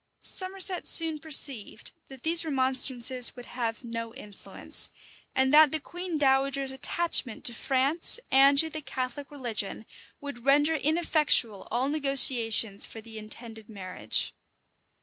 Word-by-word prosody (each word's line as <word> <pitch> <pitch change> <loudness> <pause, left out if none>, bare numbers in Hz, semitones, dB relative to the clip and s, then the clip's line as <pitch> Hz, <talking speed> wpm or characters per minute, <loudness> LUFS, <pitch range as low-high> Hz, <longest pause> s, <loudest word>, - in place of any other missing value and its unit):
[*] - - -50
Somerset 375 -1 +2
soon 320 -2 +4
perceived 280 -7 -2 0.2
that 265 -2 -15
these 335 +1 +3
remonstrances 260 -3 +2
would 245 -1 -12
have 230 -1 -6
no 230 0 -8
influence; 210 -7 -5 0.5
and 265 +1 +1
that 305 -1 +6
the 315 - -1
queen 350 +2 -7
dowager's 275 -1 0
attachment 265 -3 -1
to 240 - -3
France 275 - +1
and 275 +1 +4
to 320 - +5
the 310 0 -7
Catholic 265 +1 -7
religion 230 -7 -6 0.3
would 280 -5 -10
render 290 +4 +2
ineffectual 300 - 0
all 245 +4 -2
negotiations 255 -8 +3
for 225 - -6
the 220 0 -11
intended 220 0 -11
marriage. 185 - -3
265 Hz, 130 wpm, -26 LUFS, 230-300 Hz, 0.5 s, that